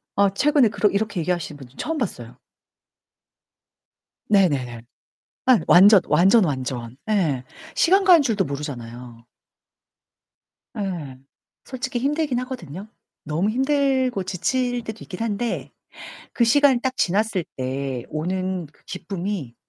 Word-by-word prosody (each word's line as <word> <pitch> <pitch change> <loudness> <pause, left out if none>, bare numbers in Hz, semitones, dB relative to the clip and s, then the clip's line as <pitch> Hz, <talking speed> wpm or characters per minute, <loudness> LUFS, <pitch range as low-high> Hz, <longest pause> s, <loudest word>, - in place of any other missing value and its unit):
아 200 0 +4
최근에 285 0 +4
그러 210 0 +1
이렇게 200 -3 -1
얘기하시는 170 -3 -3
분 135 -3 -12
처음 325 0 -3
봤어요 125 - -5 1.9
네네네. 140 - +1 0.6
아이 255 -3 +6
완전, 200 +3 +8
완전, 195 +5 +5
완전. 130 -5 -4
예. 165 -12 +1 0.3
시간 385 +3 +4
가는 355 -5 +7
줄도 220 -7 0
모르잖아요. 125 -5 -7 1.5
예. 170 -10 -4 0.5
솔직히 255 -1 -4
힘들긴 285 0 0
하거든요. 210 - -7 0.4
너무 160 +7 0
힘들고 265 -3 +1
지칠 245 +7 -1
때도 220 0 -7
있긴 180 - -9
한데 230 +1 -2 0.6
그 240 - +2
시간이 260 +1 +4
딱 260 -1 -2
지났을 195 -1 0
때 130 -1 -3
오는 185 +2 -2
그 150 - -28
기쁨이 185 - -5
195 Hz, 250 characters per minute, -23 LUFS, 150-245 Hz, 1.9 s, 완전